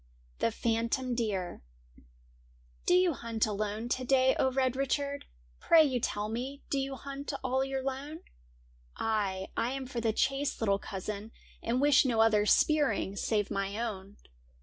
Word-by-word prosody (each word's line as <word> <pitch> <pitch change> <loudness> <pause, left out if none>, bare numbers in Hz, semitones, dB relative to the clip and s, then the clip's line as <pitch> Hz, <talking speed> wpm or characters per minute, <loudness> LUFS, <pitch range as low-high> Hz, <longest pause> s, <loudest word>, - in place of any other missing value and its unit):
THE - - +2
PHANTOM 230 +3 -1
DEER 205 -7 -2 0.6
' - - -32
Do 355 - +5
you 360 -2 +4
hunt 230 -3 -1
alone 215 +1 -3
to 255 - -1
day, 260 0 +4
O 265 - +3
Red 260 -1 +1
Richard! 280 +1 -1 0.3
Pray 325 -1 +6
you 260 -4 0
tell 210 -2 -2
me, 255 +6 -5
do 275 - +1
you 270 0 -3
hunt 275 +1 -6
all 260 +1 +1
your 270 -1 -3
lone? 275 +4 -4 0.3
' - - -32 0.2
' - - -33
Ay, 200 -4 -1
I 240 +3 0
am 270 -1 -4
for 250 -2 -4
the 225 -1 +2
chase, 275 +5 0
little 200 -3 +2
cousin, 205 +2 -6 0.3
And 240 +2 0
wish 285 0 +5
no 240 -4 0
other 215 -2 +4
spearing 275 -8 +3
save 205 0 0
my 195 +1 -2
own.' 205 -4 -5
235 Hz, 170 wpm, -30 LUFS, 205-270 Hz, 0.6 s, Pray